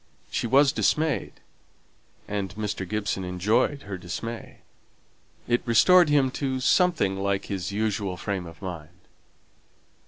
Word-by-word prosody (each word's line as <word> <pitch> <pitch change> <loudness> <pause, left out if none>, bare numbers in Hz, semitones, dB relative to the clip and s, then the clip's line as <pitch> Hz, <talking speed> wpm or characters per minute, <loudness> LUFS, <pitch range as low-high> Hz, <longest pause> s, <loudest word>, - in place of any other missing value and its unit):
She - - -1
was 135 +3 +5
dismayed, 150 - 0 0.9
and 100 -3 -3
Mr. 105 -3 -4
Gibson 105 -2 -2
enjoyed 105 +10 0
her 95 -2 -6
dismay; 110 +7 -7 0.9
it 120 0 +2
restored 165 - +5
him 140 -3 +3
to 130 -2 -1
something 145 - +2
like 100 0 -1
his 95 -1 -4
usual 100 -3 -1
frame 95 -1 -3
of 85 +4 -13
mind. 85 -2 -7
105 Hz, 120 wpm, -26 LUFS, 95-130 Hz, 0.9 s, was